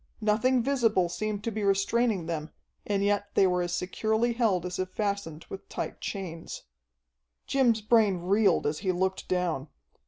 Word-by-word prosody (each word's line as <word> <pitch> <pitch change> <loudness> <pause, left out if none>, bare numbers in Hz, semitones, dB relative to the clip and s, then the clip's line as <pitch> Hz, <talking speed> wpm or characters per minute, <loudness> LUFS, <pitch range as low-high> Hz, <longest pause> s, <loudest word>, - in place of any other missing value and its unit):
Nothing 230 +4 +2
visible 225 -9 +2
seemed 205 +4 -3
to 230 - -2
be 215 0 -3
restraining 200 0 +1
them, 160 -2 -4 0.4
and 200 -1 +1
yet 205 0 +1
they 195 - +5
were 180 -1 +2
as 175 0 -2
securely 220 +6 0
held 215 -7 +1
as 180 0 -4
if 185 0 -1
fastened 200 -6 -3
with 195 - -9
tight - - -5
chains. 175 -5 -6 0.8
Jim's 240 -5 +2
brain 215 -3 +3
reeled 195 +1 +2
as 150 +1 -1
he 190 -1 0
looked 190 +1 -1
down. 175 -6 -1
195 Hz, 160 wpm, -28 LUFS, 180-220 Hz, 0.8 s, they